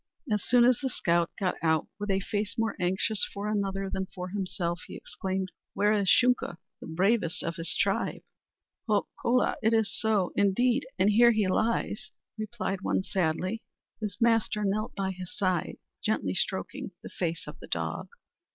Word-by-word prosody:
As 210 -2 +1
soon 245 -1 +5
as 250 -1 +4
the 265 - -1
scout 170 -7 +1
got 185 -3 +1
out, 160 -1 +2
with 205 0 -3
a 195 0 +3
face 205 +1 -2
more 225 0 0
anxious 190 +4 +1
for 200 +1 -3
another 195 -2 -1
than 190 0 -2
for 180 0 -6
himself, 180 -3 -2
he - - -8
exclaimed: 190 -1 -3 0.2
"Where 205 +2 +3
is 200 -3 +2
Shunka, 250 -8 +4 0.2
the - - -9
bravest 180 +2 +1
of 165 - -3
his 165 0 -3
tribe?" - - 0 0.7
"Ho, 210 -2 +2 0.2
kola, 250 +1 +2
it 225 +1 +3
is 220 -2 +1
so, 215 -5 +1
indeed; 240 +7 +3
and 195 +3 +4
here 235 +3 +7
he 215 -4 +3
lies," 215 +1 0 0.3
replied 215 -3 -3
one 190 - +1
sadly. 185 +4 -1 0.4
His 205 -4 -4
master 225 -2 +2
knelt 215 +3 -1
by 190 -1 -1
his 185 -1 -8
side, 185 -4 0 0.3
gently 100 - 0
stroking - - -2
the - - -7
face 170 -1 -3
of - - -9
the - - -10
dog. - - -2
200 Hz, 170 wpm, -29 LUFS, 185-220 Hz, 0.7 s, here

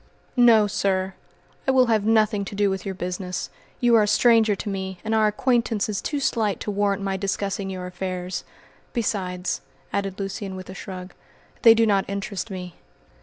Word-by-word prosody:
"No, 235 -4 +6
sir! 190 -2 0 0.5
I - - +5
will 260 -1 +5
have 220 -3 +2
nothing 215 -2 +3
to 200 - -7
do 200 -1 +2
with 190 +1 -4
your 190 - -3
business. 180 0 -4 0.3
You 240 -1 +3
are - - +6
a 210 - +2
stranger 225 -1 +4
to 205 - -7
me, 190 -2 -3
and 220 - 0
our 220 -1 +4
acquaintance 230 -1 +1
is 205 - -2
too 290 - -2
slight 220 -6 0
to 210 - -2
warrant 200 -1 0
my 195 -1 -1
discussing 200 0 -2
your 185 -1 -5
affairs. 180 0 -4 0.5
Besides," 185 -6 -2 0.3
added 195 -1 -2
Lucian, 195 0 -4
with 185 0 -8
a - - -8
shrug, 185 -1 -8 0.5
"they 230 -1 +8
do 230 0 +4
not 200 -3 +2
interest 200 +1 -4
me." 180 -2 -6
200 Hz, 180 wpm, -24 LUFS, 190-220 Hz, 0.5 s, they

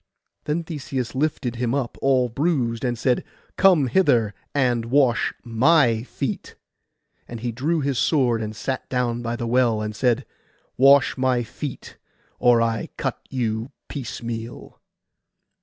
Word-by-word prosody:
Then 155 +3 -1
Theseus 135 -6 -4
lifted 130 -4 -1
him 120 +1 0
up 130 -4 -2
all 130 -2 +3
bruised, 125 -3 -1
and 120 -2 -1
said, 125 +1 +1 0.3
'Come 185 -7 +5
hither 120 - +2 0.2
and 125 -5 +1
wash 125 -1 +2
my 120 0 +3
feet.' 125 -1 -5 0.7
And 120 -2 -8
he 120 0 -2
drew 150 +8 -1
his 140 -3 -1
sword, 125 -7 +2
and 110 0 -5
sat 130 +4 -4
down 120 -2 -1
by 120 0 -3
the 120 - -4
well, 120 -2 +2
and 105 0 -4
said, 125 +2 +1 0.5
'Wash 140 +1 +5
my 130 -2 +2
feet, 130 +4 -7 0.4
or 120 -1 +5
I 115 -2 -2
cut - - -2
you 115 -2 -2 0.2
piecemeal. 120 -3 -6
125 Hz, 140 wpm, -23 LUFS, 115-135 Hz, 0.7 s, Come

